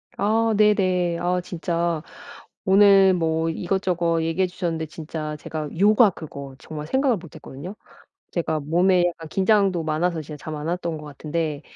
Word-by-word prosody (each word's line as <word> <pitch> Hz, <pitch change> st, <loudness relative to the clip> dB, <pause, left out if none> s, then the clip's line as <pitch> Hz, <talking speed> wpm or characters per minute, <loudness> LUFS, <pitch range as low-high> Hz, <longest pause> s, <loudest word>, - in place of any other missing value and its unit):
아 225 Hz, +2 st, +2 dB
네네. 185 Hz, -5 st, +3 dB
아 180 Hz, +1 st, 0 dB
진짜 170 Hz, -2 st, -2 dB, 0.6 s
오늘 195 Hz, -1 st, +6 dB
뭐 160 Hz, -1 st, 0 dB
이것저것 175 Hz, -1 st, 0 dB
얘기해 165 Hz, +3 st, +1 dB
주셨는데 170 Hz, -3 st, -3 dB
진짜 155 Hz, -1 st, -6 dB
제가 150 Hz, 0 st, -5 dB
요가, 210 Hz, +1 st, +6 dB
그거 140 Hz, -5 st, -9 dB
정말 150 Hz, +1 st, -7 dB
생각을 265 Hz, -, +2 dB
못했거든요. 165 Hz, 0 st, -9 dB, 0.6 s
제가 160 Hz, -3 st, -1 dB
몸에 175 Hz, +4 st, +3 dB
약간 165 Hz, -2 st, -5 dB
긴장도 195 Hz, -2 st, +2 dB
많아서 160 Hz, +2 st, 0 dB
진짜 150 Hz, -1 st, -10 dB
잠 155 Hz, -1 st, -5 dB
안 150 Hz, -, -5 dB
왔던 170 Hz, -1 st, -2 dB
거 150 Hz, -, -10 dB
같은데 150 Hz, +1 st, -4 dB
170 Hz, 305 characters per minute, -23 LUFS, 155-190 Hz, 0.6 s, 오늘